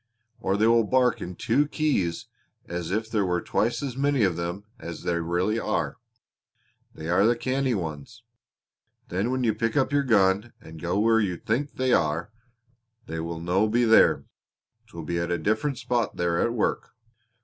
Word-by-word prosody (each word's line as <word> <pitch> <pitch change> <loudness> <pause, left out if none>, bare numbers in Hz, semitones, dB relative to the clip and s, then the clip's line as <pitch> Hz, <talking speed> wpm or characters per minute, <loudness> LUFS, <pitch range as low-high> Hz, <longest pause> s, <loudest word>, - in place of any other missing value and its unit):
Or 95 +1 0
they 110 - +3
will 115 0 +5
bark 125 +2 +2
in 90 0 -6
two 145 +10 +1
keys 115 - 0 0.4
as 85 -1 -4
if 110 +4 -1
there 110 -2 0
were 90 -2 0
twice 115 +9 -1
as 135 -3 -4
many 140 -2 +2
of 95 -4 +2
them 85 +4 -4 0.2
as 85 -5 -7
there 85 -1 0
really 90 +7 0
are. - - -2 1.0
They 80 - -7
are 90 +3 +3
the 115 +3 +4
canny 130 +1 0
ones! 85 +5 -6 0.9
Then 95 +6 -1
when 130 0 -1
you 115 -2 +2
pick 115 +5 -1
up 135 -1 +2
your 145 - +4
gun 105 -3 +2
and 80 0 -12
go 85 +2 -1
where 115 +2 +4
you 95 -5 -1
think 130 - -2
they 130 -1 +1
are, 85 +4 +1 0.7
they 80 -6 -5
will 85 0 -4
no 90 +6 +1
be 120 +3 +2
there; 110 -1 +5 0.6
'twill 85 -6 -8
be 85 +2 -2
at 85 0 -2
a 85 - +1
different 110 - 0
spot 120 -3 -1
they 90 - 0
are 85 0 +1
at 120 - +1
work." 115 - -1
105 Hz, 185 wpm, -26 LUFS, 85-120 Hz, 1.0 s, will